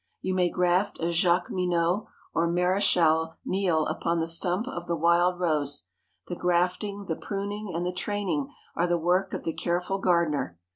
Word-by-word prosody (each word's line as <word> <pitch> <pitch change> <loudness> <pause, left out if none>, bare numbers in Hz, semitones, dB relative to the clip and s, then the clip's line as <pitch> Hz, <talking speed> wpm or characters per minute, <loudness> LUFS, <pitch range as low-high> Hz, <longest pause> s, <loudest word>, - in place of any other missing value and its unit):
You 185 - -2
may 180 -1 +2
graft 180 +3 +1
a 170 +1 0
Jacqueminot 175 +1 +1 0.3
or 165 +1 +2
Maréchal 170 -3 +3
Neil 180 -5 +1
upon 170 +2 -1
the 160 - 0
stump 180 +6 0
of 270 - -6
the 170 - 0
wild 170 +2 +3
rose. 150 -5 -1 0.4
The 175 - -5
grafting, 180 +4 0
the 160 - -2
pruning, 200 +2 -4
and 170 +1 -2
the 180 - -2
training 180 -7 -2 0.2
are 175 - +1
the 175 0 +2
work 180 +3 +1
of - - -6
the 165 - -2
careful 180 +3 -1
gardener. 170 - +1
175 Hz, 160 wpm, -27 LUFS, 165-185 Hz, 0.4 s, Maréchal